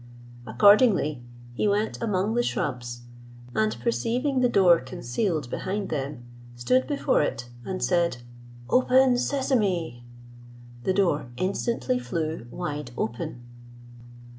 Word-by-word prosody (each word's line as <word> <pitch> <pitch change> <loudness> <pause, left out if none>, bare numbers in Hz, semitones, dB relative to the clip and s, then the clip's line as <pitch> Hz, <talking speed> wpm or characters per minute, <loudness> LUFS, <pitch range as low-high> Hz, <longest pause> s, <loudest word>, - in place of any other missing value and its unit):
Accordingly, 170 - +4 0.3
he 165 - 0
went 205 +2 0
among 210 -1 0
the 240 - +2
shrubs, 120 - -3 0.5
and 110 0 0
perceiving 240 - 0
the 250 -1 +3
door 180 -6 +5
concealed 130 - -2
behind 195 +1 -3
them, 140 -3 -4 0.3
stood 250 - +1
before 285 -2 +1
it, 120 -4 -3
and 185 +5 -4
said, 170 -7 +1 0.5
"Open, 255 - +4
Sesame." 205 - 0 0.8
The 190 - +2
door 170 -10 +1
instantly 190 - -1
flew 155 +1 -4
wide 145 0 -5
open. 120 +1 -4
175 Hz, 110 wpm, -26 LUFS, -, 0.8 s, door